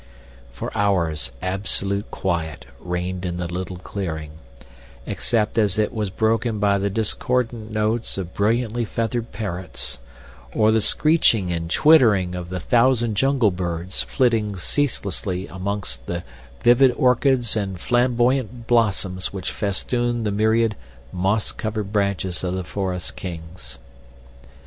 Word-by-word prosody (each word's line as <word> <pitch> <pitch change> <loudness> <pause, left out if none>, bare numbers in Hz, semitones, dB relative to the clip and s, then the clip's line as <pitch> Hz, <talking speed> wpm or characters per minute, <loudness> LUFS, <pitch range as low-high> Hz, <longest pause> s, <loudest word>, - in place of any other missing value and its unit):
For 60 - -6
hours 85 -9 +1
absolute 100 +1 0
quiet 80 -6 -3
reigned 90 +1 -3
in 90 -1 -3
the 90 - -2
little 90 +1 -4
clearing, 80 -5 -5 0.7
except 115 -1 0
as 105 -2 +2
it 105 -1 +1
was 105 -4 -2
broken 110 +3 0
by 100 -1 +2
the 100 +1 0
discordant 115 +2 0
notes 110 +1 -1
of 90 -2 -5
brilliantly 115 +3 +1
feathered 115 +1 -2
parrots, 90 - -4 0.6
or 110 0 +4
the 110 0 +3
screeching 115 - +3
and 85 -1 -3
twittering 110 - +5
of 90 -1 -5
the 90 0 -3
thousand 120 +4 +3
jungle 130 -1 +3
birds 90 0 -2
flitting 115 -6 +1
ceaselessly 95 - -1
amongst 95 -9 -4
the 85 0 -3 0.4
vivid 125 +2 +6
orchids 125 -2 +2
and 95 -4 -2
flamboyant 120 0 +1
blossoms 100 -6 +1
which 95 -2 -4
festooned 120 +3 -1
the 105 - 0
myriad, 110 +1 +2 0.4
moss 100 +4 +1
covered 105 -2 -4
branches 100 -3 0
of 90 0 -1
the 95 - -3
forest 90 -1 -3
kings. 80 -8 -7
100 Hz, 125 wpm, -22 LUFS, 90-115 Hz, 0.7 s, vivid